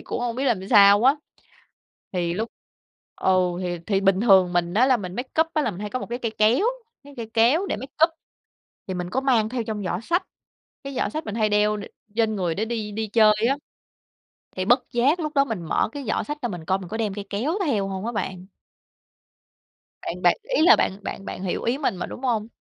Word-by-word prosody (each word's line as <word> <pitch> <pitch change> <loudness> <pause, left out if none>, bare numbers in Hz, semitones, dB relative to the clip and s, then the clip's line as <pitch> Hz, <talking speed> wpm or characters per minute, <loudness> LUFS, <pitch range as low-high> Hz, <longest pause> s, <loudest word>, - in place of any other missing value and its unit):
cũng - - -5
hông 240 -1 -2
biết 265 - -1
làm 205 -7 0
sao 205 -1 +7
á. 270 +3 +5 1.0
Thì 175 -2 -1
lúc 220 +5 -2 0.7
ừ, 190 - +1 0.3
thì 175 -1 -3
thì 195 -2 +1
bình 195 -1 +3
thường 190 -5 +5
mình 175 0 0
á 240 +5 +4
là 260 -2 +4
mình 185 -4 -7
makeup 275 +6 0
á 305 - +2
là 235 - 0
mình 195 0 -9
hay 210 - -5
có 255 - -2
một - - -6
cái 240 - -2
cây 230 -3 -2
kéo, 220 - +4 0.4
cái 285 0 -13
cây 225 -2 -7
kéo 255 - +4
để - - -2
makeup, 280 +7 +1 0.8
thì 190 - -3
mình 180 -1 -4
có 260 +7 -1
mang 240 -5 +2
theo 245 -1 -2
trong 215 -2 -4
giỏ 175 -1 -2
xách, 345 +10 0 0.6
cái 275 -1 -6
giỏ - - 0
xách 310 +1 -5
mình 210 - -5
hay 215 -2 +1
đeo 210 0 +2
đ 205 - -6 0.3
trên 225 -2 +1
người 175 -4 -1
để 215 - -1
đi 220 -2 -4
đi 220 +1 -3
chơi 215 0 +5 0.2
á. 275 - +1 1.0
Thì 185 - -1
bất 245 +6 +5
giác 270 +8 +2
lúc 305 -2 -2
đó 275 0 +4
mình 220 -9 -4
mở 160 - 0
cái 285 0 -7
giỏ - - 0
xách 295 0 -6
ra 240 - -2
mình 175 -5 -7
coi 190 +2 +1
mình 185 - -9
có 220 - -4
đem 215 -3 -1
cây 200 0 -6
kéo 230 +11 -1
theo 205 -8 0
hông 190 +1 -5
á 235 - -2
bạn. 190 -4 -4 1.5
Bạn - - -5
bạn - - +4 0.2
ý - - +3
là 350 - +8
bạn - - +1
bạn 195 - -6
bạn 190 - -6
hiểu 185 - -2
ý 240 +3 0
mình 280 -9 -1
mà, 180 - -4
đúng - - -9
hông? 225 -4 0
220 Hz, 235 wpm, -24 LUFS, 195-255 Hz, 1.5 s, là